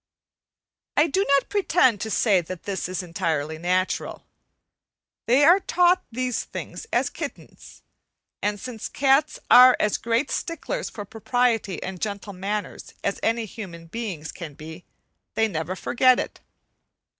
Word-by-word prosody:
I 295 Hz, -, +6 dB
do 355 Hz, +5 st, +1 dB
not 280 Hz, -1 st, +3 dB
pretend 320 Hz, -, +2 dB
to 220 Hz, -, -3 dB
say 205 Hz, -3 st, +3 dB
that 175 Hz, +1 st, -8 dB
this 195 Hz, -3 st, -3 dB
is 185 Hz, +1 st, -3 dB
entirely 160 Hz, -3 st, -2 dB
natural. 185 Hz, +2 st, -1 dB, 1.0 s
They 260 Hz, +5 st, +5 dB
are 350 Hz, +5 st, +7 dB
taught 360 Hz, 0 st, +3 dB
these 250 Hz, 0 st, -2 dB
things 450 Hz, -, -8 dB
as -, -, +1 dB
kittens, -, -, -9 dB, 0.6 s
and 205 Hz, 0 st, -1 dB
since 245 Hz, -2 st, -6 dB
cats 275 Hz, +2 st, +2 dB
are 250 Hz, 0 st, +9 dB
as 210 Hz, -, +1 dB
great 235 Hz, +4 st, 0 dB
sticklers 345 Hz, +9 st, -3 dB
for 205 Hz, -, -7 dB
propriety 225 Hz, -3 st, 0 dB
and 185 Hz, -2 st, -6 dB
gentle 200 Hz, -1 st, -4 dB
manners 200 Hz, +2 st, -5 dB
as 200 Hz, -, -1 dB
any 230 Hz, 0 st, 0 dB
human 180 Hz, -6 st, -9 dB
beings 175 Hz, -5 st, -5 dB
can 160 Hz, -5 st, -9 dB
be, 160 Hz, +4 st, -10 dB, 0.5 s
they 225 Hz, -, +3 dB
never 170 Hz, -2 st, -3 dB
forget 255 Hz, +5 st, +3 dB
it. -, -, -5 dB
215 Hz, 140 wpm, -24 LUFS, 185-255 Hz, 1.0 s, are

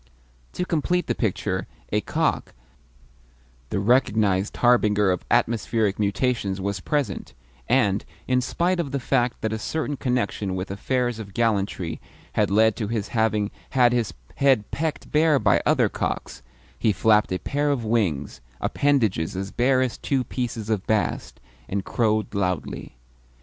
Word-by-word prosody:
To 180 Hz, -, -2 dB
complete 175 Hz, +2 st, 0 dB
the -, -, 0 dB
picture, 95 Hz, -3 st, -2 dB, 0.2 s
a -, -, +2 dB
cock, -, -, -1 dB, 1.1 s
the -, -, -1 dB
recognised 105 Hz, -3 st, +2 dB
harbinger 105 Hz, -5 st, +4 dB
of 90 Hz, -, -2 dB
atmospheric 115 Hz, -3 st, +1 dB
mutations, 105 Hz, -1 st, 0 dB
was 100 Hz, 0 st, -2 dB
present; 140 Hz, -, -2 dB, 0.3 s
and, 105 Hz, -6 st, +3 dB, 0.2 s
in 125 Hz, 0 st, +2 dB
spite 175 Hz, +7 st, 0 dB
of 140 Hz, -5 st, -2 dB
the 140 Hz, -, 0 dB
fact 125 Hz, -1 st, 0 dB
that 110 Hz, 0 st, -1 dB
a 110 Hz, -, -3 dB
certain 145 Hz, +4 st, -2 dB
connection 110 Hz, -7 st, -1 dB
with 95 Hz, +1 st, -4 dB
affairs 120 Hz, +3 st, -1 dB
of 100 Hz, -3 st, -9 dB
gallantry 100 Hz, -6 st, 0 dB, 0.3 s
had -, -, +2 dB
led 110 Hz, +2 st, +4 dB
to 110 Hz, -, -2 dB
his 110 Hz, -2 st, -2 dB
having 110 Hz, -2 st, +1 dB, 0.3 s
had 120 Hz, -1 st, +5 dB
his 120 Hz, -4 st, 0 dB, 0.3 s
head 135 Hz, -7 st, +3 dB
pecked 155 Hz, 0 st, -3 dB
bare 155 Hz, -1 st, +4 dB
by -, -, +3 dB
other -, -, +4 dB
cocks, -, -, -4 dB, 0.4 s
he 110 Hz, -, +3 dB
flapped 105 Hz, 0 st, +3 dB
a 90 Hz, -, +1 dB
pair 145 Hz, +10 st, -1 dB
of 130 Hz, -5 st, 0 dB
wings 80 Hz, -, -1 dB, 0.2 s
appendages 110 Hz, -, +1 dB
as 95 Hz, +1 st, -4 dB
bare 130 Hz, +1 st, +2 dB
as 125 Hz, -3 st, -3 dB
two 135 Hz, -2 st, 0 dB
pieces 115 Hz, -3 st, -4 dB
of 105 Hz, -3 st, -1 dB
bast 110 Hz, -1 st, -1 dB, 0.3 s
and 100 Hz, 0 st, -2 dB
crowed 110 Hz, -3 st, 0 dB
loudly. 90 Hz, -, -3 dB
110 Hz, 150 wpm, -24 LUFS, 100-130 Hz, 1.1 s, had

